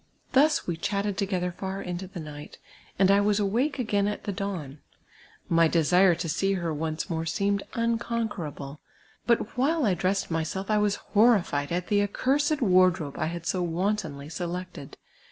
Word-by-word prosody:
Thus 295 +3 +3
we 170 -2 -2
chatted 200 +3 -1
together 185 -3 -1
far 190 +2 -5
into 180 0 -5
the 180 -1 -8
night, 150 -2 -9 0.4
and 195 0 +5
I 200 +1 +5
was 205 0 +2
awake 235 +9 0
again 205 -5 +1
at 210 - -3
the 205 - -3
da^^^l. 175 -8 -5 0.7
^ly 165 -1 +5
desire 180 +3 +4
to 170 +1 -4
see 195 +5 0
her 170 -4 -2
once 155 +1 -3
more 165 -3 -3
seemed 200 +4 0
unconquerable; 225 -11 -2 0.5
but 235 -2 +1
while 290 +4 +2
I 200 - +3
dressed 185 +2 -1
myself, 165 +5 -2
I 210 - +3
was 205 -1 +2 0.2
horrified 200 -10 +3
at 180 +1 -2
the 205 -1 +3
accursed 275 +8 +1
wardrobe 180 -7 +3
I - - 0
had 170 0 -5
so 185 - 0
wantonly 170 -4 -2
selected. 175 -2 -6
190 Hz, 165 wpm, -27 LUFS, 165-210 Hz, 0.7 s, and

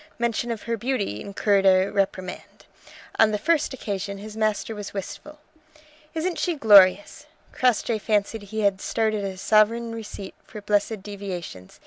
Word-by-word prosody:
Mention 235 0 -1
of 230 -2 -4
her 230 0 -2
beauty 210 - -2
incurred 200 0 +1
a 190 -1 +5
reprimand. 190 -2 -3 0.5
On 220 - +6
the 210 - -1
first 310 +7 +1
occasion 200 -5 -4
his 210 +2 -9
master 215 0 -1
was 205 -1 -8
wistful. 300 +10 -7 0.8
"Isn't 335 +2 -2
she 350 -2 0
glorious!" 200 -6 +5 0.3
Crossjay 240 -2 +1
fancied 210 +1 0
he 220 +1 -3
had 200 -2 +1
started 215 -2 -1
a 190 -1 -4
sovereign 225 +3 +2
receipt 210 -3 -8
for 215 - -10
blessed 205 0 -1
deviations. 190 - -7
210 Hz, 145 wpm, -24 LUFS, 200-230 Hz, 0.8 s, On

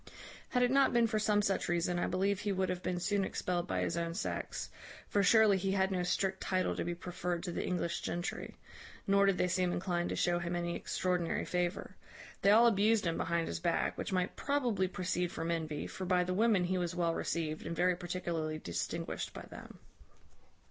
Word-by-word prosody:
Had 250 -1 +2
it 245 - +3
not 275 0 +4
been 235 -1 +4
for 220 -1 0
some 210 -1 +2
such 195 -3 0
reason, 175 0 +1
I - - 0
believe 190 +2 0
he 205 - -1
would 190 -1 0
have 180 -1 -2
been 180 -1 -2
soon 200 +2 +1
expelled 180 -2 -2
by 95 -1 -1
his 90 - -1
own 170 0 -2
sex; 210 - -4 0.4
for 205 - +2
surely 215 0 +5
he 195 +1 0
had 190 0 +2
no 185 -1 0
strict 190 +1 0
title 185 -1 0
to - - -2
be 175 0 -3
preferred 175 -1 -4
to 180 - -3
the - - -2
English 170 -2 -1
gentry; 175 +1 -4 0.5
nor 200 0 +4
did 195 -2 +3
they 180 - +2
seem 180 0 +1
inclined 175 -1 -1
to - - -2
show 175 0 +1
him 175 0 -3
any 175 0 -2
extraordinary 180 -2 -1
favour. 180 +1 -2 0.5
They 200 - +4
all 225 +3 +7
abused 215 -1 +3
him 165 -1 0
behind 170 0 0
his 85 - -3
back, - - 0
which - - -4
might 185 -1 0
probably 245 -10 0
proceed 180 -1 -2
from 165 +1 -3
envy; 155 -3 -2
for 190 - -6
by 180 0 +3
the 180 +1 -2
women 210 -1 +3
he 185 +1 0
was 175 -1 -2
well 170 -2 +1
received, 155 -2 -2
and 170 - -3
very 180 +2 +3
particularly 170 -3 -3
distinguished 85 - -4
by - - -7
them. - - -10
180 Hz, 210 wpm, -33 LUFS, 175-195 Hz, 0.5 s, all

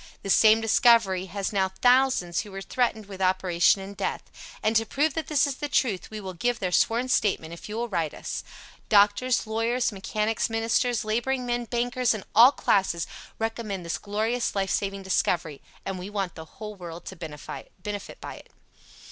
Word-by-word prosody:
The 195 - -1
same 220 +2 +6
discovery 225 -5 +4
has 200 +1 -3
now 190 -1 +2
thousands 245 -5 +3
who 210 - -5
were 195 0 -6
threatened 220 -3 -1
with 195 -1 -9
operation 185 0 +3
and 195 +1 -8
death. 195 - -3 0.4
And 220 +1 +1
to 225 - +4
prove 285 +7 0
that 320 -1 -3
this 300 -3 +3
is 280 -2 -3
the 295 - -4
truth 230 -9 0
we 215 - -6
will 190 -2 -6
give 240 +7 0
their 185 -4 -2
sworn 235 +7 +2
statement 195 -9 0
if 170 - -10
you 210 - -5
will 235 +1 -2
write 170 -7 -2
us. - - -5 0.5
Doctors, 210 +5 +4
Lawyers, 230 +3 0
Mechanics, 210 +3 -1
Ministers, 225 +1 +1
Laboring 245 +4 -1
Men, 240 0 -1
Bankers 245 0 0
and 205 - -6
all 240 +5 +8
classes 190 - +1 0.3
recommend 220 -5 -3
this 170 - -3
glorious 220 +4 -1
life 195 -1 0
saving 195 -1 -2
discovery, 170 -5 0 0.2
and 190 -1 -4
we 185 +2 -6
want 195 -4 -3
the 160 - -9
whole 210 +5 -9
world 175 -3 -9
to 190 - -7
benefit 180 +5 -8
by - - -7
it. - - -15
210 Hz, 180 wpm, -26 LUFS, 190-235 Hz, 0.5 s, all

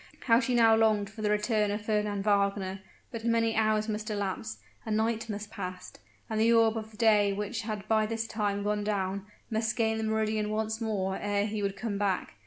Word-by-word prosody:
how 230 -2 +4
she 250 0 0
now 225 -2 +6
longed 215 -3 +2
for 215 0 -9
the 210 - +1
return 210 0 +1
of 205 +1 -3
Fernand 210 -2 0
Wagner; 200 -2 +1 0.3
but 230 -2 -6
many 230 -1 +2
hours 215 0 +2
must 215 0 -3
elapse 205 +1 -3 0.3
a - - -7
night 225 +1 0
must 210 0 -5
pass 185 -2 -6 0.3
and 220 -1 -2
the 230 +1 +4
orb 225 -1 +4
of 220 -1 -6
day 210 -3 +4
which 210 +3 -3
had 215 -2 -5
by 215 -1 +2
this 225 0 -2
time 205 -2 -1
gone 210 0 0
down, 200 -1 -2 0.2
must 220 +1 0
gain 220 -1 +1
the - - -2
meridian 220 -1 0
once 220 +1 -2
more 195 -4 -1
ere 205 0 0
he 215 0 -3
would 200 0 -2
come 200 -1 -3
back. 195 -3 -1
215 Hz, 200 wpm, -29 LUFS, 205-220 Hz, 0.3 s, now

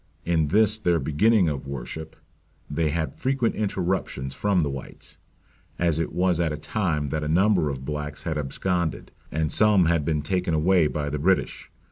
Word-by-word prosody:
In 80 -3 +2
this 110 +5 +3
their 90 -5 +2
beginning 95 +6 +3
of 70 -3 -3
worship 70 +4 -6 0.5
they 75 +2 0
had 80 +1 -2
frequent 130 -3 0
interruptions 95 -9 -2
from 100 -3 +1
the 75 - 0
whites; 70 -1 -8 0.6
as 85 -2 +1
it 80 - -2
was 90 -2 +1
at 85 -2 +1
a 75 - -3
time 75 -4 -1
that 75 +2 -2
a - - -2
number 90 0 +3
of 65 -1 -5
blacks 75 0 -5
had 80 - -2
absconded, 85 +4 -2 0.2
and 80 0 -1
some 105 -4 +4
had 85 -2 +2
been 75 -1 -1
taken 90 +1 0
away 85 +1 +3
by 75 -1 -3
the 75 - -2
British. 95 +5 0
80 Hz, 175 wpm, -25 LUFS, 75-95 Hz, 0.6 s, some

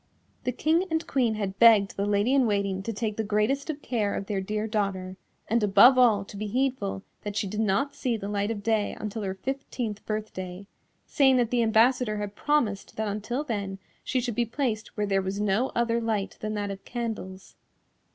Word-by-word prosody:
The 250 - +1
King 320 +8 +1
and 320 0 -1
Queen 240 -6 +1
had 200 -2 -4
begged 220 -4 +6
the 200 +1 -1
Lady 205 +5 +2
in 265 -3 +4
Waiting 200 -2 0
to 230 - -3
take 215 -1 -3
the 220 - 0
greatest 215 +8 0
of 295 -1 -4
care 215 -5 -1
of 195 - -3
their 195 -1 -2
dear 210 +2 -2
daughter, 195 -4 -2 0.3
and 230 +2 +2
above 210 +6 +7
all 225 -6 +4
to 205 - -11
be 210 +1 -4
heedful 240 -5 -1 0.2
that 205 -1 -5
she 205 - 0
did 210 +2 -4
not 220 +7 +1
see 240 -3 -1
the 200 -2 -6
light 205 0 -1
of 210 -3 -4
day 220 -2 0
until 215 +1 -4
her 190 -2 -3
fifteenth 245 -2 -4
birthday, 200 -3 -5 0.4
saying 270 -4 +4
that 240 -2 +1
the 245 -1 +2
ambassador 225 0 +3
had 205 -1 -4
promised 240 -10 0
that 220 0 -2
until 215 +7 -3
then 200 -8 -3 0.3
she 260 - 0
should 245 -1 -2
be 240 - +1
placed 230 -2 -2
where 210 - +1
there 195 -1 +1
was 190 +1 -3
no 210 +5 +1
other 235 0 +1
light 215 -3 -1
than 215 0 -3
that 205 -1 -2
of 195 0 -8
candles. 220 -6 -6
215 Hz, 205 wpm, -27 LUFS, 200-240 Hz, 0.4 s, above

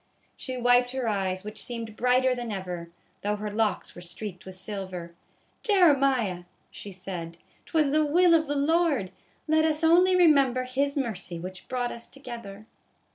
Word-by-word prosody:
She 255 -1 -6
wiped 245 0 +3
her 260 -3 -2
eyes, 190 -3 -1
which 210 +1 -6
seemed 230 -3 -5
brighter 250 +2 +3
than 240 -2 -5
ever, 180 -4 -5 0.3
though 205 +1 0
her 210 0 -5
locks 210 -3 -1
were 175 - -11
streaked 180 +1 -6
with 190 - -7
silver. 185 -3 -5 0.5
"Jeremiah," 275 - +3 0.3
she 205 - -9
said, 180 -3 -7 0.3
"'twas 310 -4 +2
the 310 +1 +3
will 340 +4 +4
of 320 -1 +3
the 290 - -1
Lord. 290 - +1 0.4
Let 315 0 +3
us 315 0 +1
only 360 +3 +5
remember 275 -8 +4
His 275 +3 -1
mercy, 210 -9 -3
which 185 +2 -8
brought 245 -1 -2
us 235 - -8
together." 235 -6 -9
240 Hz, 160 wpm, -27 LUFS, 195-280 Hz, 0.5 s, only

